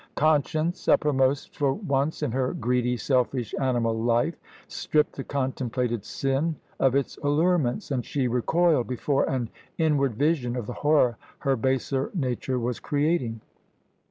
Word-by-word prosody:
Conscience, 155 +3 +1
uppermost 135 -2 +2
for 140 -2 +1
once 155 -5 -1
in 145 - 0
her 130 +1 0
greedy, 125 +1 0
selfish, 125 -2 0
animal 120 -4 +1
life, 120 +7 +1 0.3
stripped 150 -1 0
the 135 - -5
contemplated 125 -4 -2
sin 135 +7 -1 0.2
of 135 -1 +3
its 140 -1 -1
allurements, 150 - +1
and 130 -3 0
she 135 +2 -1
recoiled 130 +4 +2
before 135 +3 0
an 125 -3 -1 0.3
inward 145 -7 +2
vision 140 -3 +1
of 120 -4 -3
the 125 - -5
horror 145 -6 +2 0.2
her 135 -2 +1
baser 130 +2 0
nature 130 -4 -1
was 120 0 -2
creating. 145 -7 0
135 Hz, 135 wpm, -26 LUFS, 125-150 Hz, 0.3 s, of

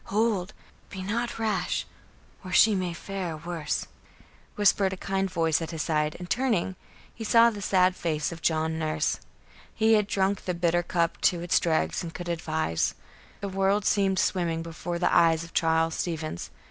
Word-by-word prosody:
Hold! 210 -3 0 0.4
Be 190 -1 -6
not 230 +5 -2
rash, 220 -1 -1 0.6
or 185 - -7
she 215 +4 +6
may 185 -3 -1
fare 180 -1 -5
worse," 165 -1 -3 0.7
whispered 200 -1 +3
a - - -6
kind 195 0 -1
voice 165 -3 +1
at 165 - -4
his 160 -2 -3
side, 150 -1 0
and, 180 - -8
turning, 220 -6 0 0.4
he 225 - -7
saw 230 +1 +5
the 205 -2 -7
sad 185 -1 +3
face 155 -3 -1
of 165 -1 -8
John 160 0 0
Nurse. 155 -1 0 0.6
He 225 0 +4
had 210 -2 +3
drunk 195 0 0
the 180 - -1
bitter 170 0 +2
cup 170 -1 -1
to 175 -2 +2
its 175 0 +2
dregs 160 -2 0
and 170 - -5
could 175 -1 -5
advise. 160 - -1 0.5
The 200 - -3
world 195 +1 +1
seemed 195 -2 +2
swimming 170 -4 0
before 170 +1 -5
the 175 - +1
eyes 165 -1 +4
of 165 - -12
Charles 165 0 +2
Stevens. 160 - -4
175 Hz, 170 wpm, -27 LUFS, 165-195 Hz, 0.7 s, she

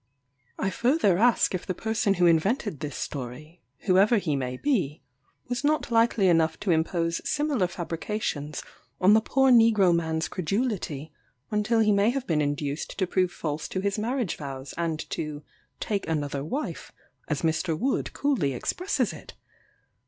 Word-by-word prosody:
I 190 - -1
further 235 - +2
ask 240 -2 +3
if 185 - -4
the 185 - -2
person 220 -1 0
who 180 -1 +3
invented 175 - +2
this 150 -1 -5
story 150 +5 -6 0.2
(whoever 200 +4 +4
he 160 -7 0
may 130 -2 -3
be,) 175 - -1 0.4
was 245 +3 -3
not 300 -4 +1
likely 230 -3 +3
enough 165 -2 +3
to 195 - +1
impose 165 +1 0
similar 290 -10 0
fabrications 170 -3 -4 0.4
on 190 +3 +6
the 220 - +5
poor 265 +3 +3
negro 225 -6 +5
man's 160 -1 0
credulity, 180 - -2 0.4
until 215 +2 +2
he 215 -1 +4
may 200 +2 +4
have 265 +1 -2
been 155 -8 +1
induced 145 0 -3
to 190 - +1
prove 185 0 +1
false 150 -2 -4
to 190 - -3
his 200 +2 -1
marriage 235 -2 -1
vows, 135 -2 -7
and 165 -2 -2
to 150 -1 -4 0.4
"take 200 -5 -2
another 145 -3 -2
wife," 270 - -4 0.4
as - - -2
Mr. 160 0 0
Wood 260 - -1
coolly 245 - 0
expresses 365 - -1
it? - - -12
185 Hz, 155 wpm, -26 LUFS, 155-225 Hz, 0.4 s, on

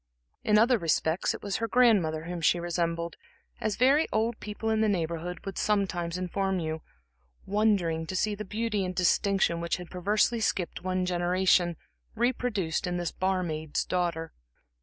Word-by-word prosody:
In 210 0 +4
other 235 +2 +4
respects, 165 0 +1
it - - -11
was 200 -1 -1
her 230 - -2
grandmother 205 -11 +3
whom 175 0 -5
she 175 +2 +3
resembled, 170 -1 -2 0.4
as 215 -2 -1
very 275 +6 +4
old 220 +1 0
people 210 +1 -3
in 220 0 +2
the 220 - +3
Neighborhood 170 -1 -3
would 195 - -4
sometimes 180 -5 0
inform 190 +1 -1
you, 160 -1 -3 0.6
wondering 190 -6 +1
to 185 - -4
see 210 +3 +1
the 210 +1 -5
beauty 210 0 -1
and 185 0 -4
distinction 185 -1 +2
which 170 0 -1
had 180 -1 -10
perversely 210 +5 +1
skipped 190 -6 -1
one 185 0 0
generation, 180 -1 +2 0.4
reproduced 225 -8 0
in 175 0 -1
this 175 -1 -2
bar 185 0 0
maid's 155 -2 -2
daughter. 170 -3 -2
185 Hz, 160 wpm, -28 LUFS, 170-210 Hz, 0.6 s, In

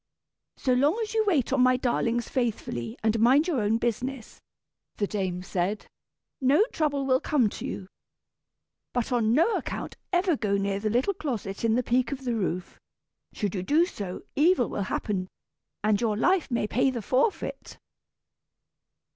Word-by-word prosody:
"So 255 - +1
long 285 - +3
as 435 - -5
you 440 -1 +3
wait 280 - +2
on 270 - +3
my 255 0 +5
darlings 240 -1 0
faithfully, 210 - -2
and 220 0 +2
mind 265 +8 +5
your 295 -10 0
own 210 +2 +2
business," 240 +1 -3 0.6
the 205 - +1
dame 190 -3 -3
said, 190 +3 -2 0.6
"no 280 +11 +4
trouble 285 -3 0
will 260 -1 +3
come 255 -8 +2
to - - -6
you. 190 - -6 1.1
But 245 -1 -1
on 230 -3 +2
no 330 - +3
account - - -5
ever 355 -2 +2
go 205 -6 0
near 195 0 -1
the 215 +1 -1
little 250 - +1
closet 230 - -4
in 225 -1 +3
the 250 - +1
peak 245 0 +1
of 270 -1 -5
the 245 -2 -1
roof. 185 -4 -3 0.5
Should 205 -3 -2
you 190 - -2
do 300 - +3
so, 200 - -6
evil 305 -3 +3
will 200 - -2
happen, 190 -3 -2 0.6
and 210 0 +2
your 215 -3 +1
life 360 - +2
may 235 -4 0
pay 250 +5 +2
the 240 -4 -4
forfeit." 265 - -1
240 Hz, 165 wpm, -27 LUFS, 210-275 Hz, 1.1 s, my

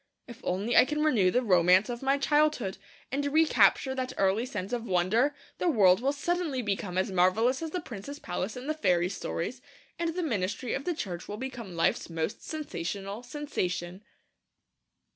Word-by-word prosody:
If 240 -2 -11
only 200 +6 -1
I - - +9
can 300 +3 -1
renew 225 -12 +4
the 250 +7 +1
romance 185 -1 +5
of 240 -1 -5
my 275 +1 +2
childhood, 295 -8 +1 0.3
and 280 +2 -1
recapture 300 -3 +4
that 260 -1 -3
early 195 +5 +2
sense 200 -3 -5
of 240 -2 -1
wonder, 215 +9 +2 0.2
the - - 0
world 195 - +5
will 270 +2 +2
suddenly 295 -3 -1
become 195 -3 -2
as 190 +1 +1
marvellous 215 - +3
as 325 - -3
the 360 +3 -3
prince's 245 +6 -8
palace 190 -2 -4
in 250 - -7
the 310 - 0
fairy 180 - +2
stories, 200 +5 -4 0.4
and 335 -1 -1
the 365 - -1
ministry 220 - -2
of 275 - -3
the 350 - -1
Church 180 - -5
will 205 - -5
become 240 -7 -6
life's 165 +1 +1
most 165 +3 -3
sensational 200 - -5
sensation. 190 - -4
235 Hz, 175 wpm, -29 LUFS, 185-280 Hz, 0.4 s, I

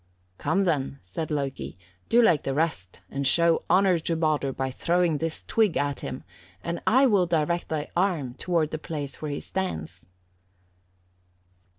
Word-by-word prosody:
"'Come 195 - +1
then,' 145 -6 0
said 125 - -5
Loki, 135 - -3 0.3
'do 240 +1 +5
like 170 -9 +4
the 135 - -2
rest, 145 - -2
and 140 0 0
show 170 +2 +4
honour 190 -2 +4
to 165 +1 -1
Baldur 155 -4 +1
by 130 0 -3
throwing 170 +2 +1
this 165 -1 -2
twig 215 -7 +2
at 145 -1 -1
him, - - -6 0.4
and 170 - -3
I 260 +4 +6
will 200 -8 +4
direct 170 +1 0
thy 150 -2 -2
arm, 170 -9 +1
toward 165 +2 0
the 155 - -3
place 150 -3 -5
where 155 - -3
he 145 - -3
stands.' 90 - -3
155 Hz, 160 wpm, -26 LUFS, 140-175 Hz, 0.4 s, I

